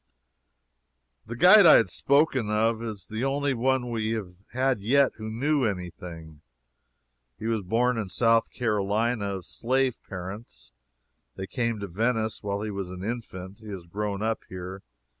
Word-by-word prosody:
The 115 - -5
guide 185 - +8
I - - +10
have 95 -6 +4
spoken 140 - +2
of 110 +1 +1
is 110 -5 -6
the 110 +5 -4
only 140 +1 +1
one 125 0 0
we 110 -1 -1
have 100 -5 -5 0.2
had 130 -1 +1
yet 135 +7 +3
who 110 0 -6
knew 140 +6 +1
any 90 -6 -2
thing. 80 -3 -11 1.0
He - - -8
was 115 -2 0
born 115 +5 +1
in 105 -4 -4
South 115 +2 +3
Carolina, 105 -1 0
of 95 -3 -7
slave 130 +3 0
parents. 95 - -8 0.6
They 95 - -5
came 115 0 -2
to 100 - -4
Venice 110 +4 -1
while 100 -1 -3
he 110 - -3
was 100 -2 -4
an 90 0 -7
infant. 100 -4 -6
He 110 - -13
has 95 -4 -7
grown 100 +3 -3
up 110 0 -1
here. 95 +1 -7
110 Hz, 160 wpm, -27 LUFS, 100-120 Hz, 1.0 s, I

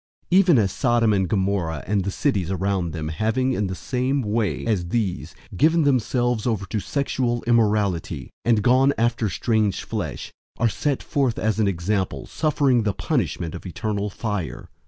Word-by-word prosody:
001:007 180 - +6
Even 175 -7 +5
as 100 -4 +2
Sodom 120 -4 +2
and 95 -3 +1
Gomorrah, 95 -7 -1
and 100 0 0
the 100 - -2
cities 100 - 0
around 95 -1 -1
them, 80 -2 -4
having, 110 +10 0
in 105 -4 -1
the 95 - -4
same 130 +9 -1
way 105 -1 -1
as 100 -7 0
these, 100 -2 -2 0.2
given 160 - +3
themselves 125 -3 +1
over 110 -5 -1
to 105 +4 -2
sexual 125 -1 -1
immorality 105 - +1
and 115 -3 +2
gone 130 +4 +4
after 115 -2 +1
strange 110 -2 0
flesh, 100 -10 -5 0.2
are 120 - +2
set 140 +5 -1
forth 135 -5 0
as 110 0 0
an 105 - +3
example, 95 +1 -1
suffering 145 -5 +1
the 105 -2 0
punishment 85 - -1
of 85 - -7
eternal 105 +2 -2
fire. 105 -5 -4
110 Hz, 165 wpm, -23 LUFS, 95-125 Hz, 0.2 s, 001:007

